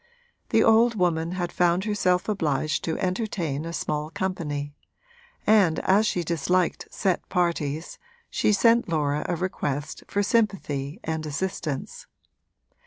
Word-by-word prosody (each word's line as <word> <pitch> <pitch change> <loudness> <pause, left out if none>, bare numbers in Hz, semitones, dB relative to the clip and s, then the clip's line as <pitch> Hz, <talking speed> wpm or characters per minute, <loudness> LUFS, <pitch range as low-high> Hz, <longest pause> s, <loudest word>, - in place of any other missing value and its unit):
The - - +4
old 230 +1 +5
woman 170 -3 0
had 175 -2 -2
found 175 +1 +2
herself 185 -4 +1
obliged 155 -7 0
to 160 - -1
entertain 180 -6 -2
a 165 - -4
small 150 -2 -2
company, 150 -6 -3 0.7
and 195 -7 +4
as 205 +3 +3
she 175 - 0
disliked 170 +2 0
set 190 -4 -1
parties 170 -4 -1 0.3
she - - +2
sent 230 +1 +4
Laura 150 -2 0
a 175 - +1
request 150 -5 -3
for 205 - 0
sympathy 190 - 0
and 160 -1 -2
assistance. 150 -2 -4
175 Hz, 125 wpm, -25 LUFS, 155-190 Hz, 0.7 s, old